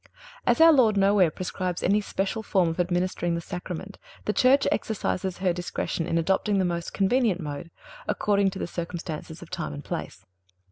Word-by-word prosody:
As - - +4
our 325 0 +8
Lord 225 -7 +4
nowhere 195 -2 +4
prescribes 180 +1 -4
any 205 +3 +3
special 200 +2 -2
form 190 -5 +2
of 165 - -5
administering 175 -1 0
the - - -2
Sacrament, 180 +3 -6 0.3
the 210 - 0
Church 260 +4 +4
exercises 190 -4 -1
her 185 -2 +1
discretion 175 -1 -3
in 170 - 0
adopting 190 +4 +1
the 190 - +2
most 170 -1 -2
convenient 205 -1 +2
mode, 150 0 -6 0.4
according 200 -1 +2
to 190 - -8
the - - -2
circumstances 170 -1 -6
of 175 - -15
time 75 - -4
and 70 - -8
place. - - -6
185 Hz, 175 wpm, -26 LUFS, 170-200 Hz, 0.4 s, our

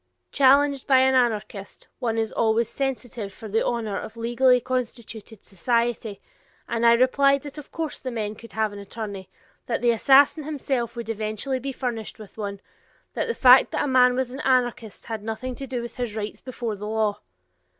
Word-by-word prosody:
Challenged 280 0 +4
by 265 - +5
an 265 0 +4
anarchist, 215 -5 -1
one 230 -2 -1
is 225 -1 -1
always 225 0 +2
sensitive 245 -6 -4
for 220 +3 -10
the 220 +2 0
honor 220 -4 -2
of 220 - -9
legally 245 +2 +3
constituted 235 -4 -5
society, 230 +1 -1 0.5
and 235 0 +1
I 235 - +7
replied 275 +3 +3
that 290 +1 -8
of 295 - -13
course 325 -2 -4
the 260 - -5
men 215 -3 -3
could 230 +1 -14
have 220 -1 0
an 205 - -8
attorney, 200 -2 -7 0.4
that 235 0 -2
the 240 - +5
assassin 275 +6 +5
himself 270 -5 -3
would 235 -2 -6
eventually 220 +4 -2
be 270 +2 -4
furnished 240 -4 -4
with 215 -3 -13
one, 200 -2 -5 0.5
that - - -2
the 465 - -2
fact 255 0 +7
that - - 0
a - - -1
man 250 -1 +4
was 255 -1 -1
an 265 - -7
anarchist 245 -5 0
had 225 -2 -5
nothing 225 +4 -4
to 270 +2 -7
do 245 -2 -3
with 235 - -9
his 240 -4 -3
rights 215 -1 -5
before 240 -4 -4
the 210 +1 -7
law! 215 -1 0
235 Hz, 190 wpm, -24 LUFS, 220-260 Hz, 0.5 s, I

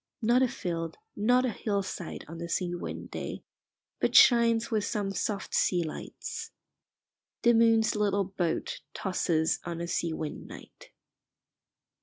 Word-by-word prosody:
Not 240 +3 +4
a 260 - +5
field, 170 -9 -4 0.2
not 245 +5 +3
a 250 - 0
hillside, 200 -5 -3
on 165 +2 -8
a 170 - -5
sea 175 0 -1
wind 175 - -6
day, - - -5 0.6
but - - 0
shines 235 -2 +6
with 215 -2 +1
some 205 -1 -1
soft 195 +1 -3
sea 175 -2 +2
lights. 155 - -6 0.9
The 240 -1 +6
moon's 225 -1 +4
little 200 -1 +2
boat 180 -3 -2 0.2
tosses 165 -4 0
on 170 -1 -5
a 170 - -2
sea 170 -1 -1
wind 155 -1 -5
night. - - -13
195 Hz, 140 wpm, -29 LUFS, 170-225 Hz, 0.9 s, shines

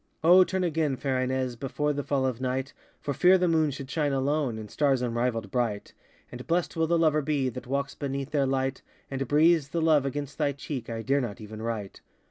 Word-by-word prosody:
O 180 +3 +8
turn 190 0 -2
again, 160 -5 0
fair 130 -1 -1
Ines, 130 -1 -1
Before 145 +4 -2
the 145 - -2
fall 135 -1 0
of 130 -2 -2
night, 130 +1 -2 0.3
For 140 - -3
fear 185 +6 +5
the 180 -1 +1
moon 160 -2 +3
should 135 -1 -6
shine 145 0 0
alone, 135 -2 0
And 110 -2 -8
stars 135 -4 +2
unrivalltd 115 -3 -1
bright; 115 -5 -2 0.4
And 125 +1 -9
blessed 170 +1 0
will 165 -1 +1
the 170 +1 +2
lover 155 -2 +3
be 140 -3 0
That 125 +1 -8
walks 140 +1 -2
beneath 140 0 -4
their 140 -3 +2
light, 135 0 -1 0.3
And 135 -1 -2
breathes 155 +1 +4
the 165 - -2
love 155 -4 +3
against 145 +1 -5
thy 145 -2 +1
cheek 135 -3 -6
I 115 -1 -4
dare 140 +5 +2
not 115 -5 -5
even 110 0 -8
write! 110 -4 -4
135 Hz, 215 wpm, -27 LUFS, 125-150 Hz, 0.4 s, O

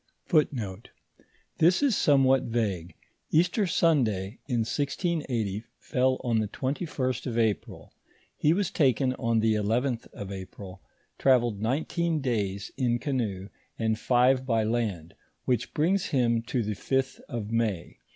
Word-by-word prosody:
* 115 - -4
This 175 - +4
is 270 -7 +3
somewhat 135 -4 +4
vague; 100 -7 -2 0.3
Easter 180 +5 +2
Sunday, 120 - +1
in 120 -4 0
1680, 130 - -1
fell 130 0 0
on 115 -3 +1
the 110 - 0
21st 130 - -2
of 120 -2 -3
April; 110 -3 -1 0.4
he 150 - +2
was 190 +1 +1
taken 130 -2 +2
on 115 -1 +1
the 110 0 +3
11th 115 +4 0
of 100 -1 -8
April, 95 0 -9 0.4
travelled 120 -6 +3
nineteen 160 +7 0
days 100 -7 -2
in 120 -3 +1
canoe, 110 -9 -2 0.3
and 110 -1 0
five 130 +1 +3
by 115 -4 +1
land, 105 -8 -2 0.3
which 125 -2 0
brings 180 +5 +1
him 120 -5 +2
to 120 0 -2
the 105 0 -2
6th 135 +6 -1
of 115 -5 -4
May. 110 -7 -1
120 Hz, 130 wpm, -27 LUFS, 110-135 Hz, 0.4 s, This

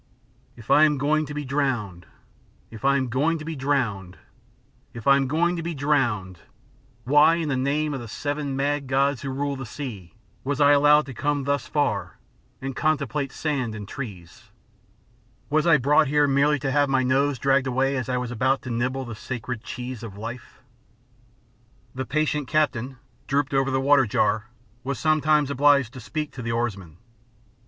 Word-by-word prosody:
"If 115 -1 -8
I 150 - +7
am 150 -2 +1
going 150 +2 +1
to 150 - -7
be 150 -1 -4
drowned 120 - -2 0.6
if 110 +1 -11
I 140 0 +4
am 130 -1 -1
going 145 +7 +1
to 155 - -8
be 165 0 -4
drowned 120 -10 -1 0.8
if 115 - -8
I 140 - +6
am 135 -1 +1
going 170 +5 +1
to - - -3
be 170 0 -4
drowned, 120 - 0 0.6
why, 150 +6 +5
in 165 -3 -2
the 135 - 0
name 145 +3 0
of 135 - -3
the 120 - -8
seven 145 +4 -3
mad 140 0 -1
gods 135 0 +1
who 140 - -4
rule 140 +1 -2
the 135 - -6
sea, 105 - -8 0.3
was 140 +2 -2
I 145 0 +6
allowed 150 +1 +5
to 135 - -8
come 145 +3 -1
thus 140 -2 -1
far 145 -1 -1 0.4
and 135 -1 -5
contemplate 140 -3 -1
sand 130 -8 -2
and 105 -1 -7
trees? 95 -12 -9 1.0
Was 155 +2 +2
I 165 -2 +6
brought 145 +3 +3
here 150 +1 +3
merely 140 +2 +3
to 135 - -1
have 145 0 +2
my 135 -1 +2
nose 135 +2 +1
dragged 135 +1 +2
away 135 +2 +1
as 130 -2 -3
I 125 - 0
was 125 -1 -3
about 130 +3 0
to 125 - -5
nibble 130 +3 -2
the 120 - -7
sacred 120 +1 -6
cheese 125 -2 -6
of 105 -4 -9
life?" 115 +3 -8 1.3
The 130 0 -5
patient 150 -1 0
captain, 135 -4 0 0.3
drooped 140 0 0
over 135 0 +2
the 130 0 0
water 135 -1 +4
jar, 105 +2 0 0.3
was 140 +2 -3
sometimes 155 -2 +2
obliged 140 -3 +3
to 130 - -9
speak 150 +6 -4
to 130 - -8
the 115 -1 -3
oarsman. 100 -9 -3
135 Hz, 180 wpm, -24 LUFS, 125-145 Hz, 1.3 s, I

